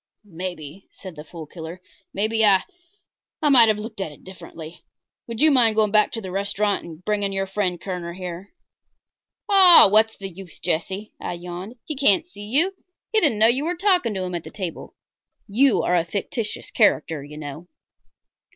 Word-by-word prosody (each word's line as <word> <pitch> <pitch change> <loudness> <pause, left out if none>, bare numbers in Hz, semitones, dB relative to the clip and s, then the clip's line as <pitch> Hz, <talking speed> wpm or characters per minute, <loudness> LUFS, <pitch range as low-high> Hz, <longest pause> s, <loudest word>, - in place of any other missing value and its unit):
"Maybe," 175 -2 -8
said 185 -4 -11
the 150 - -9
Fool 160 0 -10
Killer 165 +3 -9 0.3
"maybe 220 +2 0
I 195 -3 +5 0.8
I 300 - +2
might 245 -5 +7
have 215 -1 +2
looked 215 -1 -7
at 165 - -4
it 150 - -17
differently. 170 -3 -11 0.4
Would 230 -1 -5
you 310 0 +7
mind 235 -5 +4
going 215 -2 +2
back 210 0 +3
to 225 - -3
the 190 -3 -7
restaurant 200 +1 0
and 170 +1 -12
bringing 205 -2 0
your 195 0 -1
friend 190 -2 -2
Kerner 180 -3 -5
here?" 180 +1 -8 1.0
"Oh, 380 - +8
what's 220 +1 +3
the 195 - -6
use, 190 -1 -12
Jesse," 190 +6 -3
I - - -4
yawned. 180 +5 -8
"He 305 - -5
can't 260 -8 +3
see 205 +3 -11
you. 305 - +1 0.4
He 435 - +3
didn't 285 -10 +2
know 215 - +5
you 250 +5 +2
were 345 +3 -2
talking 355 - +1
to 190 - -2
him 180 -1 -5
at 170 -2 -4
the - - -9
table, 185 -5 -7 0.5
You 250 +5 +3
are 180 - +1
a 170 - +2
fictitious 210 +5 -5
character, 155 -2 +1
you 150 +1 -11
know." 155 +3 -8
195 Hz, 185 wpm, -22 LUFS, 175-225 Hz, 1.0 s, Oh